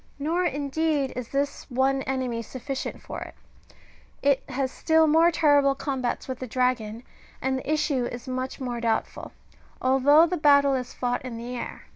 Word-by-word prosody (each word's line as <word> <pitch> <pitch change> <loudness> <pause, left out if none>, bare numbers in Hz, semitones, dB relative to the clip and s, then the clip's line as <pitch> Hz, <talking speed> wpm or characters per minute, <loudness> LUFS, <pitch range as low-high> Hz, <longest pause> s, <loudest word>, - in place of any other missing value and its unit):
Nor, 330 +5 0
indeed, 290 -1 0
is 250 -2 -5
this 280 +2 -3
one* 265 +1 +1
enemy 255 -3 -1
sufficient 260 +4 -6
for - - -7
it; - - -8 0.9
it 280 -1 +3
has 260 0 -1
still 320 0 +3
more 325 +2 +5
terrible 290 -4 +3
combats 265 -3 -3
with 260 -1 -5
the 255 - -5
dragon,^^ 240 -2 -1 0.4
and 265 0 0
the 280 - -4
issue 300 -5 +1
is 245 +2 -7
much 255 0 -4
more 245 -3 -4
doubtful, 225 -1 -2 0.5
although 270 +5 +5
the 355 +1 -2
battle 280 -2 +5
is 255 -2 -2
fought 245 -1 -1
in 250 -3 -6
the 240 +2 -6
air. 240 - -6
265 Hz, 165 wpm, -26 LUFS, 250-290 Hz, 0.9 s, more